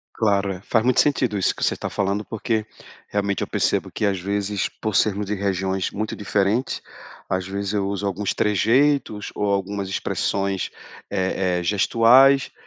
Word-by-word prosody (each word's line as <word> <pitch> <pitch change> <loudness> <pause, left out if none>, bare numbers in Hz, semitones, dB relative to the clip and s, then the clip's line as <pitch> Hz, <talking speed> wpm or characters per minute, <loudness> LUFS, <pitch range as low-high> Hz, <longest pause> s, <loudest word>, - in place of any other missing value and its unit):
Claro, 100 -3 +1
eh, 90 - -9
faz 110 0 +1
muito 125 - +3
sentido 125 -8 +2
isso 95 - +1
que - - -5
você - - +3
está - - -5
falando, 100 +2 -1
porque, 110 0 -2 0.4
realmente, 100 -1 -1
eu - - -2
percebo - - 0
que 105 - -2
às 95 -2 0
vezes, 100 +1 -2
por 110 -2 -4
sermos 105 -1 +2
de 100 - -2
regiões 95 -2 -1
muito 110 +1 -4
diferentes, 105 +4 0 0.4
às 95 0 -2
vezes 100 +1 -3
eu 100 -1 0
uso 100 0 -3
alguns 100 +1 -1
trejeitos 115 +2 +2
ou 105 - -1
algumas 100 0 -2
expressões, 95 0 -1 0.4
eh 95 -2 0
eh, - - -4
gestuais 120 +8 +5
100 Hz, 165 wpm, -22 LUFS, 95-110 Hz, 0.4 s, gestuais